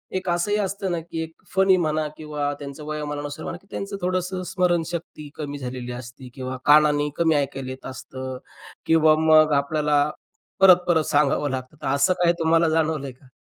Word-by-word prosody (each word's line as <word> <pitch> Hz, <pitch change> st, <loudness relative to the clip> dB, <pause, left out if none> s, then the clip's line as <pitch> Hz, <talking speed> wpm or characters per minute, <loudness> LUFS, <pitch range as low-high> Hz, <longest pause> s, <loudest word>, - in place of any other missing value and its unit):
एक 185 Hz, -1 st, -2 dB
असंही 175 Hz, +5 st, +1 dB
असतं 195 Hz, -1 st, -2 dB
ना 170 Hz, -, -1 dB
की 165 Hz, 0 st, -6 dB
एक 160 Hz, 0 st, -9 dB, 0.2 s
फनी 190 Hz, -1 st, +5 dB
म्हणा 155 Hz, -2 st, 0 dB
किंवा 150 Hz, -2 st, -3 dB
त्यांचं 140 Hz, +1 st, -8 dB
वयामानानुसार 145 Hz, -1 st, -5 dB
म्हणा -, -, -5 dB
की 195 Hz, -, -27 dB
त्यांचं 195 Hz, 0 st, -5 dB
थोडंसं 185 Hz, +1 st, -2 dB
स्मरणशक्ती 170 Hz, -4 st, -1 dB
कमी 145 Hz, -2 st, -5 dB
झालेली 125 Hz, -2 st, -6 dB
असते 125 Hz, +1 st, -9 dB
किंवा 130 Hz, -1 st, -5 dB
कानाने 150 Hz, 0 st, +5 dB
कमी 165 Hz, -2 st, +3 dB
ऐकायला 135 Hz, -2 st, -2 dB
येत 130 Hz, -, -10 dB
असतं 130 Hz, 0 st, -7 dB, 0.5 s
किंवा 160 Hz, -1 st, +5 dB
मग 155 Hz, -1 st, +5 dB
आपल्याला 145 Hz, +1 st, +2 dB, 0.5 s
परत, 185 Hz, -2 st, +8 dB
परत 160 Hz, -3 st, +3 dB
सांगावं 145 Hz, 0 st, +2 dB
लागतं. 130 Hz, +2 st, -5 dB
तर -, -, -4 dB
असं 140 Hz, +6 st, +3 dB
काय 170 Hz, -, +5 dB
तुम्हाला 165 Hz, 0 st, +3 dB
जाणवलंय 155 Hz, -4 st, 0 dB
का? 130 Hz, +2 st, -21 dB
155 Hz, 170 wpm, -23 LUFS, 140-170 Hz, 0.5 s, परत